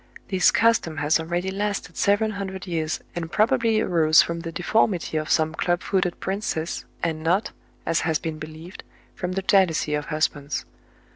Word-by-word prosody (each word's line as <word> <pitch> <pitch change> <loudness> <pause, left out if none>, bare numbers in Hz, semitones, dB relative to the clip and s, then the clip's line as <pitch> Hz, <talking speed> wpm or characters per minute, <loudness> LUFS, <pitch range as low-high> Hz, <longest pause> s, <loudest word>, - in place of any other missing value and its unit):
This 185 -2 +4
custom 225 -9 +2
has 150 +2 +2
already 175 +3 -2
lasted 200 -3 -3
seven 205 +2 +2
hundred 195 -2 -5
years, 160 -3 -2
and 165 -1 -4
probably 225 0 +2
arose 160 -5 +4
from 170 0 -4
the 165 0 -6
deformity 180 -1 0
of 155 0 -1
some 160 0 +2
club 175 +1 0
footed 185 -3 0
princess, 190 -4 -3 0.2
and 160 -2 -1
not, 180 +6 +1 0.3
as 165 - +1
has 160 -1 +1
been 160 0 -5
believed, 155 +4 -9 0.3
from 180 -1 -4
the 195 +1 -2
jealousy 180 -6 +3
of 150 0 -1
husbands. 150 -2 -2
175 Hz, 160 wpm, -24 LUFS, 160-195 Hz, 0.3 s, This